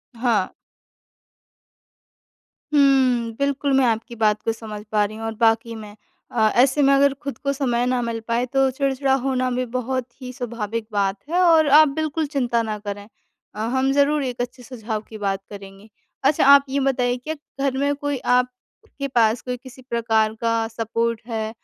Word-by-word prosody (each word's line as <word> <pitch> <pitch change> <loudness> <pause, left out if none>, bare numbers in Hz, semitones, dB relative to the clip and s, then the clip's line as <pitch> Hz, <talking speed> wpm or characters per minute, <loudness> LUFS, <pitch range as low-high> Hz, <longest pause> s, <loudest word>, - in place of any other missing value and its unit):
हाँ। 230 -5 +1 2.2
हुँ, 260 -5 +3
बिल्कुल 280 0 0
मैं 265 - +4
आपकी 230 +1 -1
बात 215 -2 +1
को 225 - +1
समझ 215 -2 -8
पा 210 -1 +3
रही 215 - -7
हूँ 225 - -6
और 225 0 -4
वाक़ई 230 0 +2
में 210 -2 -10 0.4
अ, 220 -2 +3
ऐसे 265 +4 +4
में 275 - +5
अगर 275 0 +4
खुद 275 -4 -5
को 280 0 -2
समय 245 -3 0
ना 250 -1 0
मिल 230 -1 -3
पाए 235 +1 0
तो 270 +1 +2
चिड़चिड़ा 270 0 0
होना 255 -1 0
भी 250 +1 -1
बहुत 255 0 -2
ही 255 -1 -6
स्वाभाविक 230 -3 -4
बात 200 -1 0
है 350 - +1
और 325 -4 +5
आप 310 0 +7
बिल्कुल 315 0 -1
चिंता 240 -4 +1
ना 215 -1 -3
करें। 205 0 -7 0.5
अ, - - -7
हम 260 +4 0
ज़रूर 285 +1 +2
एक 245 -2 -3
अच्छे 245 +1 -6
सुझाव 220 -3 -5
की 220 - -8
बात 195 -1 -2
करेंगे। 195 +1 -12 0.3
अच्छा 280 +1 +3
आप 280 0 +8
ये 280 +1 0
बताइए, 250 -2 +1
क्या 310 +6 -5 0.2
घर 275 -1 0
में 285 +1 +1
कोई 285 -1 -3 0.2
आपके 250 +2 -4
पास 230 -3 +2
कोई 250 -1 -4
किसी 260 +1 -14
प्रकार 225 -2 +1
का 230 -1 +1
सपोर्ट 230 0 -2
है, 220 -2 -3
245 Hz, 180 wpm, -22 LUFS, 225-270 Hz, 2.2 s, आप